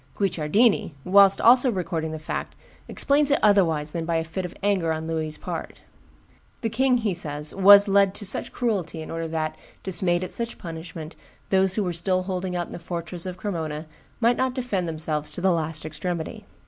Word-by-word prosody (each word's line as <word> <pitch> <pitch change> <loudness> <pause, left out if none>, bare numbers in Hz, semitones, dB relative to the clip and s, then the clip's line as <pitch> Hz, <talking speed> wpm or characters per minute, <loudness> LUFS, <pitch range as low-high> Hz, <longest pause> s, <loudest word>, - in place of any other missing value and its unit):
Guicciardini, 195 0 +1
whilst 195 +1 +6
also 250 +2 +6
recording 170 -5 -3
the 160 - -5
fact, 155 - -5 0.3
explains 285 +1 +2
it 285 - +4
otherwise 165 -8 +3
than 170 0 -3
by 165 0 -1
a 165 - +1
fit 170 +3 -5
of 180 - -8
anger 190 -5 +1
on 160 0 -3
Louis's 160 -1 -1
part: - - -6 0.8
"The 225 -3 -2
king," 255 +2 +2
he 220 -5 -1
says, 150 -3 -4
"was 200 +1 +8
led 200 0 +3
to 205 - -5
such 195 - +1
cruelty 195 -9 -2
in - - -9
order 165 0 -3
that, 155 -1 -3 0.3
dismayed 180 -1 +2
at 185 - -5
such 235 0 -3
punishment, 165 -1 -8 0.4
those 190 -1 +2
who 215 - 0
were 180 -2 -2
still 185 +2 0
holding 185 -1 -3
out 175 -1 -1
in - - -15
the - - -6
fortress 170 +1 -6
of 180 0 -6
Cremona 160 -6 -4 0.3
might 240 0 +3
not 260 -1 0
defend 210 -9 -2
themselves 155 -2 -3
to - - -6
the 190 +1 +2
last 160 -2 -2
extremity." 165 +1 -5
180 Hz, 190 wpm, -24 LUFS, 160-200 Hz, 0.8 s, was